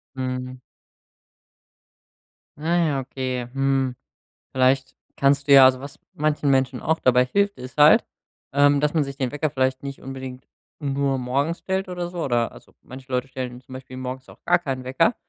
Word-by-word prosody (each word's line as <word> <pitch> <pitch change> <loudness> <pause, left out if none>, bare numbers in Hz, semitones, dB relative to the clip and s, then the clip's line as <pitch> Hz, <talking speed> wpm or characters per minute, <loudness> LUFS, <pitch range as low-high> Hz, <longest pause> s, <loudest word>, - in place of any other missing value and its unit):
Mhm. 130 0 -4 2.0
Na 170 +3 +1
ja, 140 -3 0
okay, 130 -1 -4
hm, 135 -2 +1 0.6
vielleicht 130 0 +2 0.2
kannst 140 +1 +2
du 140 - +6
ja 135 -1 +10
also 130 0 +4
was 140 +2 -10
manchen 150 -1 0
Menschen 130 -1 +1
auch 160 +1 0
dabei 125 0 +4
hilft, 200 +8 0
ist 130 +2 -10
halt, 150 +1 +7 0.5
ähm, 145 0 +4
dass 150 +1 +1
man 160 -3 +2
sich 140 0 -7
den 130 -3 -1
Wecker 150 +1 -1
vielleicht 130 -1 -1
nicht 140 0 -7
unbedingt 130 -1 -8 0.3
nur 140 -2 0
morgens 140 +6 -1
stellt 190 +1 -2
oder 180 -1 -4
so. 175 -2 -4
Oder 120 -3 0
also - - -17
manche 130 +1 -12
Leute 125 +1 -1
stellen 125 -2 -6
zum 130 0 -14
Beispiel 130 0 -9
morgens 130 0 -6
auch - - -17
gar 175 0 +3
keinen 135 -6 -4
Wecker, 130 - +2
135 Hz, 175 wpm, -23 LUFS, 130-145 Hz, 2.0 s, ja